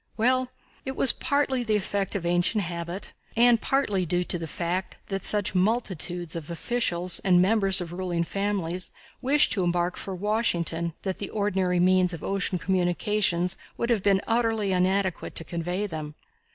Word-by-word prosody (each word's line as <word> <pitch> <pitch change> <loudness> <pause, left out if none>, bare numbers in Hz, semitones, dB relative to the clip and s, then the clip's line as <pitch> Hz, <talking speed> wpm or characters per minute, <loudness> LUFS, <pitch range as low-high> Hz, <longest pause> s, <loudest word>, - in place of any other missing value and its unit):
Well, 255 +2 +2 0.3
it 265 0 -4
was 265 - +4
partly 275 -3 0
the 220 -2 +1
effect 200 -1 -1
of 185 -4 -2
ancient 175 +5 +2
habit, 170 +2 -5 0.2
and 235 -1 +5
partly 210 -9 +1
due 175 +1 0
to 175 - 0
the 165 - -5
fact 175 +4 -3
that 195 -2 -3
such 205 -3 +2
multitudes 180 -4 -1
of 165 -2 -6
officials 180 -1 0
and 180 -2 +4
members 195 0 +4
of 175 -1 -6
ruling 175 -2 -1
families 185 -1 -2 0.3
wished 275 +3 +3
to 190 - +1
embark 175 +1 0
for 195 - -5
Washington 175 -5 0
that 190 -2 -3
the 200 - -3
ordinary 190 -4 0
means 180 0 +3
of 165 - -11
ocean 195 -1 0
communications 180 +1 +1 0.2
would 235 +1 0
have 225 -4 +2
been 195 0 +2
utterly 225 -3 +1
inadequate 185 0 0
to - - -2
convey 175 +4 -3
them. 155 -5 -6
185 Hz, 165 wpm, -26 LUFS, 175-210 Hz, 0.3 s, and